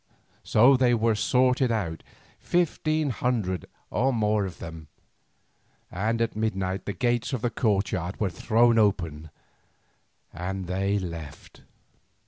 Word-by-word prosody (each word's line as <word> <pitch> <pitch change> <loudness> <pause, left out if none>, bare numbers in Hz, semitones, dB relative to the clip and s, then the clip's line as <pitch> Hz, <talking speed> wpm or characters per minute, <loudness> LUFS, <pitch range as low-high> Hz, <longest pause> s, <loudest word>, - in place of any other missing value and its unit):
So 125 +6 +5
they 125 -1 +3
were 115 0 +2
sorted 125 +3 +2
out, 85 -8 -2 0.4
fifteen 155 -4 0
hundred 105 -5 -1 0.2
or 130 +5 +2
more 105 -3 +1
of 95 - -7
them, 80 -2 -9 1.0
and 110 +5 -1
at 115 - -3
midnight 95 -3 -2
the 100 - -3
gates 120 +2 0
of 125 - -3
the 120 - 0
courtyard 95 -5 -1
were 100 -4 0
thrown 115 +5 +3
open, 85 -7 0 1.0
and 95 +2 -4
they 95 +3 0
left. 85 -6 -8
105 Hz, 120 wpm, -26 LUFS, 95-120 Hz, 1.0 s, So